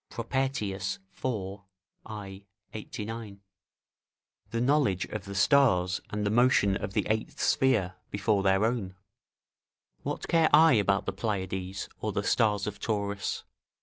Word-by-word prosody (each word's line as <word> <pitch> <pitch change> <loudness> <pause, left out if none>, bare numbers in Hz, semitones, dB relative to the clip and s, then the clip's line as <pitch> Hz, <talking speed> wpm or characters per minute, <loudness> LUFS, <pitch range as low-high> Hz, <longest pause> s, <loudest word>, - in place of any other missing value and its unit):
Propertius, 115 -6 -2 0.3
iv. 100 -6 -2 0.5
I, 100 -2 -8 0.3
89.] 110 -1 -6 1.1
the 115 - -2
knowledge 125 -8 +2
of 105 -2 -6
the 100 0 -7
stars 95 -7 +3
and 105 0 -2
the 100 - +1
motion 115 -4 +4
of 95 - -4
the - - 0
eighth 110 +1 -2
sphere 110 -9 +2 0.2
before 100 0 +1
their 95 +2 +3
own: 110 -6 -2 1.1
["What - - -4
care 165 -2 +4
I 160 0 +7
about 100 -3 +2
the 100 - -2
Pleiades 95 -2 -3
or - - -2
the - - -2
stars 105 -3 +2
of 105 -1 -5
Taurus?" 100 -2 -2
105 Hz, 130 wpm, -29 LUFS, 95-115 Hz, 1.1 s, I